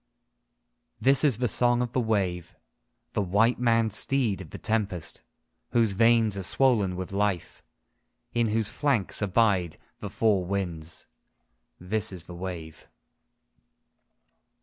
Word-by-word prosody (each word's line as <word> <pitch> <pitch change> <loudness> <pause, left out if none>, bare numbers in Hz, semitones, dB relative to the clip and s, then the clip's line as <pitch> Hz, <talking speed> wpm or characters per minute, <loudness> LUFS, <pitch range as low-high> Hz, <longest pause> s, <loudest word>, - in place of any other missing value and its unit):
II - - -51
This 135 +1 +4
is 140 -8 +3
the 125 +1 0
song 120 +1 +2
of 120 -1 -5
the - - +1
wave, 95 -7 -1 0.6
the - - 0
white 105 +6 +2
maned 115 -3 +2
steed 115 -4 +1
of 85 - -10
the - - -8
Tempest 100 -8 -2 0.5
Whose 115 -3 +3
veins 115 0 +3
are - - -3
swollen 105 -2 +2
with 95 +1 -5
life, 100 -3 -1 0.7
In 120 -1 +2
whose 110 0 0
flanks 130 -10 -1
abide 95 -4 +1 0.2
the - - -6
four 105 -5 +2
winds. 85 -4 -4 0.7
This 105 +4 -2
is 90 -4 -7
the 90 - -11
wave. 85 -3 -7
105 Hz, 130 wpm, -27 LUFS, 90-115 Hz, 0.7 s, This